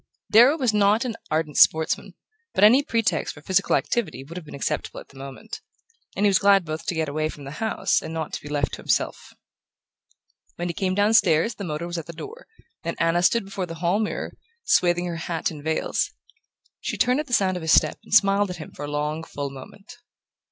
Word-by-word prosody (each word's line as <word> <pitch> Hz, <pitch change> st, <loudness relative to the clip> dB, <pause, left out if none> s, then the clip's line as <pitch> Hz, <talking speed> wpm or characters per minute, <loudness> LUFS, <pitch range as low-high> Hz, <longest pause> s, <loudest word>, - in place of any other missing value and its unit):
Darrow 245 Hz, +8 st, +7 dB
was 250 Hz, -7 st, +1 dB
not 210 Hz, +4 st, +3 dB
an 235 Hz, -3 st, -3 dB
ardent 155 Hz, -1 st, -1 dB
sportsman, 160 Hz, 0 st, +3 dB, 0.4 s
but 195 Hz, -, +2 dB
any 240 Hz, +6 st, +7 dB
pretext 225 Hz, -, -1 dB
for 145 Hz, -, -14 dB
physical 190 Hz, +2 st, +2 dB
activity 195 Hz, -, -1 dB
would 160 Hz, +5 st, -11 dB
have 175 Hz, -4 st, -8 dB
been -, -, -9 dB
acceptable 140 Hz, -, -3 dB
at -, -, -14 dB
the 135 Hz, -, -15 dB
moment; 140 Hz, -, -8 dB, 0.5 s
and 205 Hz, -, +1 dB
he -, -, +6 dB
was 195 Hz, -2 st, +4 dB
glad 200 Hz, -2 st, +4 dB
both 155 Hz, 0 st, -6 dB
to 175 Hz, -, -1 dB
get 160 Hz, -1 st, -1 dB
away 155 Hz, +2 st, -1 dB
from 145 Hz, -, -10 dB
the 140 Hz, -, -8 dB
house 220 Hz, -4 st, +1 dB
and 160 Hz, -, -7 dB
not 160 Hz, -1 st, -4 dB
to -, -, -4 dB
be 145 Hz, -, -10 dB
left 145 Hz, -2 st, -1 dB
to -, -, -4 dB
himself. -, -, -2 dB, 1.2 s
When 175 Hz, +1 st, -3 dB
he -, -, -2 dB
came 185 Hz, +2 st, -1 dB
downstairs 205 Hz, -2 st, +3 dB
the 200 Hz, -, -7 dB
motor 155 Hz, 0 st, -4 dB
was 175 Hz, 0 st, -4 dB
at 165 Hz, -, -9 dB
the 170 Hz, -, -7 dB
door, 460 Hz, -, -10 dB, 0.4 s
and -, -, -4 dB
Anna 165 Hz, +1 st, +2 dB
stood 215 Hz, +4 st, +3 dB
before 195 Hz, -2 st, -4 dB
the 165 Hz, -, -7 dB
hall 175 Hz, +5 st, 0 dB
mirror, 215 Hz, -, -3 dB, 0.3 s
swathing 175 Hz, 0 st, +2 dB
her 170 Hz, -1 st, -4 dB
hat 165 Hz, 0 st, -2 dB
in 150 Hz, -2 st, -9 dB
veils. 160 Hz, +1 st, -1 dB, 0.7 s
She -, -, -4 dB
turned 250 Hz, +3 st, +2 dB
at 300 Hz, -, -3 dB
the 245 Hz, -, -6 dB
sound 190 Hz, -4 st, +2 dB
of 180 Hz, -, -4 dB
his 160 Hz, 0 st, 0 dB
step -, -, +3 dB
and -, -, -17 dB
smiled 200 Hz, -1 st, +4 dB
at 180 Hz, -, -5 dB
him 155 Hz, -, -9 dB
for 145 Hz, -, -7 dB
a -, -, -6 dB
long 150 Hz, +2 st, -2 dB
full 140 Hz, -3 st, -5 dB
moment. 195 Hz, -, -12 dB
175 Hz, 220 wpm, -24 LUFS, 155-205 Hz, 1.2 s, Darrow